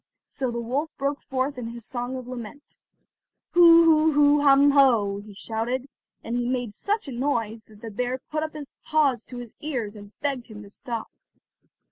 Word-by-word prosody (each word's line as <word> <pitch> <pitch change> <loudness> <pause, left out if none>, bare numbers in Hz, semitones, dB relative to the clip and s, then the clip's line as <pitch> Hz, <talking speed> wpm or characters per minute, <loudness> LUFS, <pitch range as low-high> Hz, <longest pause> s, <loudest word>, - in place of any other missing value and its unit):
So 260 -2 -3
the 235 0 -3
wolf 265 +7 -2
broke 280 +1 -2
forth 260 0 -2
in 235 - -5
his 235 -1 -8
song 245 +1 -4
of 255 -1 -7
lament: 250 +3 -9 0.8
"Hu, 335 -1 +8
hu, 320 -1 +5
hu, 290 0 +5
hum, 280 0 +6
hoh," 230 -8 +4
he 205 0 -12
shouted, 235 +5 -3 0.4
and 230 - -3
he 245 0 -1
made 245 -4 -2
such 410 - -2
a - - -5
noise 235 -4 -2
that 215 -1 -18
the 225 - -7
bear 250 +4 -2
put 305 0 -1
up 310 0 -4
his 300 -1 -6 0.2
paws 285 -7 +2
to 250 - -9
his 240 -2 -8
ears, 245 -9 -4
and 205 -1 -12
begged 275 -4 -2
him 210 -2 -10
to 200 - -14
stop. 230 0 -6
250 Hz, 190 wpm, -25 LUFS, 230-285 Hz, 0.8 s, Hu